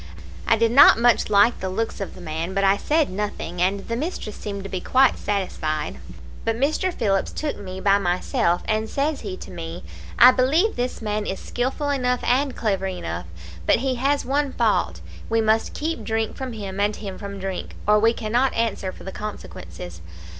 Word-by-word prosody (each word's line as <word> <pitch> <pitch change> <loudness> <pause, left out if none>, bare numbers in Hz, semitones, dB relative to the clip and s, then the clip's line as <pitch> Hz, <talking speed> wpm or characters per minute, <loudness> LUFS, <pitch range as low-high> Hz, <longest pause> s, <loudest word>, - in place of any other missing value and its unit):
I 225 - +4
did 230 0 +2
not 260 -2 +8
much 235 -1 +3
like 205 +3 +4
the 190 - -3
looks 220 +3 -3
of 195 - -5
the 185 - -11
man, 165 +3 -4
but 195 - +1
I 195 0 +5
said 300 - +1
nothing, 185 -3 -4
and 195 +2 0
the 230 - -2
mistress 255 - -4
seemed 200 -1 -6 0.2
quite 260 +1 +4
satisfied. 155 -7 -2 0.4
"But 225 - 0
Mr. 310 +7 +1
Phillips 195 - 0
took 300 -1 -3
me 190 -2 -7
by 200 +1 +4
myself, 175 -1 0
and 220 0 0
says 285 +2 -1
he 195 -4 -5
to - - -10
me, 170 0 -7 0.3
'I 250 +3 +9
believe 290 - +2
this 245 -1 -3
man 210 0 -2
is 190 - -3
skilful 265 +4 -2
enough 250 -3 0
and 265 +2 +1
clever 195 -4 -1
enough, 85 - -5 0.4
but - - +6
he 265 +2 0
has 280 +1 +1
one 280 +1 0
fault - - +1 0.3
we 225 0 +2
must 220 0 +1
keep 310 -6 -3
drink 220 0 -1
from 260 -2 -5
him 200 -3 -6
and 205 +1 +1
him 195 -3 -7
from 200 -1 -6
drink, 190 -1 -5
or 210 0 +5
we 225 +2 +4
cannot 240 +3 0
answer 220 -4 -1
for - - -13
the 190 - -6
consequences. 90 - -8
215 Hz, 190 wpm, -23 LUFS, 190-250 Hz, 0.4 s, I